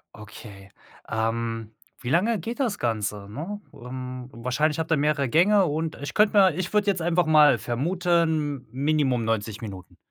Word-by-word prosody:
Okay. 100 -2 -12 0.4
Ähm, 115 0 -2 0.3
wie 120 - -4
lange 200 - +2
geht 230 - -6
das 230 -7 0
Ganze? 105 -3 -2
Ne, 170 - -6
ähm, 125 0 -7
wahrscheinlich 145 +7 -1
habt 160 0 -3
ihr 160 - +4
mehrere 140 -2 +1
Gänge 190 - +4
und 160 +1 -2
ich 145 - -5
könnte 210 0 +3
mir 190 -4 +6
ich 185 +2 -4
würde 210 -1 +2
jetzt 185 -4 +1
einfach 175 +1 +2
mal 150 -2 +6
vermuten, 160 +1 0
m - - -28
minimum 135 -3 +1
90 110 -1 -2
Minuten. 95 -5 -9
145 Hz, 165 wpm, -25 LUFS, 115-170 Hz, 0.4 s, mir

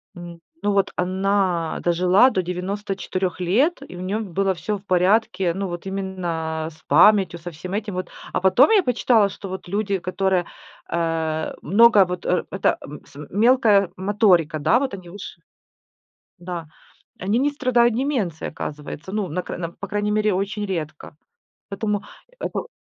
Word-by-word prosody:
м, 175 -1 -9 0.2
ну 205 - +2
вот 195 -1 +2
она 185 -2 0
дожила 180 +8 +4
до 185 - 0
94 185 0 -3
лет 240 - +1
и - - -10
у 180 - -7
неё 200 +4 -2
было 195 0 0
всё 205 +5 -3
в 195 - -17
порядке. 185 -1 +2
Ну 195 +1 -3
вот 175 +1 -6
именно 170 -5 -3
с 155 - -20
памятью, 185 +3 +5
со 175 +1 -7
всем 180 +5 -8
этим 205 -1 -3
вот. 185 -1 -4 0.2
А - - 0
потом 190 - +5
я 415 -3 +6
почитала, 235 -4 +3
что 195 - -9
вот 190 -1 -7
люди, 200 0 -1
которые, 185 0 0 0.4
э, 160 -2 -1
много 210 +2 +6
вот, 180 0 -5
э, 180 - +1
это, 195 - +1
м 150 +2 -9
с - - -20
мелкая 210 -3 +4
моторика, 185 -5 +2
да, 235 - +3
вот 270 -4 -2
они 180 -2 -12
выше 185 -3 -10 1.0
Да, 175 -2 -6 0.5
они 200 +6 0
не 285 +2 +2
страдают 245 -5 +2
деменцией, 240 - -2
оказывается. 150 +4 -7
Ну, 210 -3 -1
на 175 +4 -3
край - - -6
на 170 -2 -3
по 200 - -8
крайней 205 0 -1
мере, 215 -1 +2
очень 200 +2 -2
редко. 155 -6 -5 0.6
Поэтому 205 0 -2 0.4
это - - -3
190 Hz, 165 wpm, -22 LUFS, 175-210 Hz, 1.0 s, я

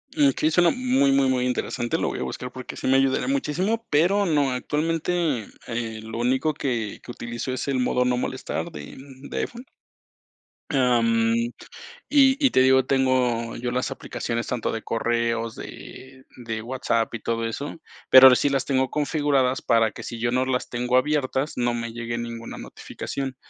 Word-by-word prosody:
Mm, 145 -2 +5
okey, 155 +4 0
suena 175 +2 +4
muy, 255 - +2
muy, 135 0 +3
muy 130 -1 +1
interesante, 120 -1 -1
lo - - -1
voy - - -5
a - - -2
buscar 125 - -5
porque 130 0 -8
sí - - -4
me 135 - +5
ayudaría 135 - +1
muchísimo, 225 - -1
pero 180 +7 +3
no, 145 -6 +2
actualmente, 155 0 -1 0.2
eh, 115 -2 -4
lo 110 +1 -6
único 130 +6 +1
que 120 -7 -3
que 120 - -8
utilizo 120 +1 -5
es 130 +2 -3
el 135 -2 0
modo 125 0 +1
no 125 0 +1
molestar - - -3
de 75 -1 -9 0.3
de - - -5
iPhone. 245 +2 -5 1.0
Am, 115 -4 +2 0.8
y 270 -2 +5
y - - +3
te 130 - +3
digo, 130 0 +5
tengo 125 -3 +1
yo 120 +1 -3
las 125 +2 -1
aplicaciones 115 -3 -4
tanto 125 -2 -2
de 115 - -4
correos, 115 0 -1
de 130 0 -11 0.2
de 110 -1 -4
WhatsApp 115 -2 -1
y 115 - -4
todo 115 +1 -2
eso, 140 +8 -5 0.3
pero 130 0 +10
ahora 125 -1 +8
sí 145 - +2
las 135 -1 0
tengo 130 -2 0
configuradas 145 -3 +1
para 115 -2 +3
que, - - -9
si 115 - -6
yo 120 +1 0
no 130 +1 +2
las 130 -1 -1
tengo 125 +1 0
abiertas, 140 +1 0
no 120 -1 0
me 115 -1 -4
llegue 120 0 -4
ninguna 115 -1 -6
notificación. 135 -2 -6
130 Hz, 180 wpm, -24 LUFS, 115-140 Hz, 1.0 s, pero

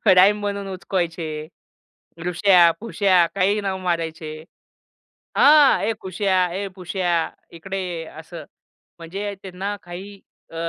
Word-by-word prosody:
Rhyme 205 +3 +6
बनवून 200 -1 -3
उचकवायचे. 165 -5 -3 0.8
ऋष्या-फूश्या 180 +1 +4
काहीही 200 +2 +2
नाव 190 -1 -2
मारायचे. 165 -3 -3 1.0
हां, 295 -1 +6
"ये 225 - +1
कुश्या, 185 -1 +1
ये 200 +1 -3
पुश्या 175 -2 -1 0.3
इकडे 190 +4 -5
ये," 175 -3 -4
असं. 160 +1 -10 0.6
म्हणजे 195 +5 -5
त्यांना 195 +2 -4
काही 190 +3 -9 0.3
अ, - - -11
185 Hz, 105 wpm, -22 LUFS, 170-200 Hz, 1.0 s, Rhyme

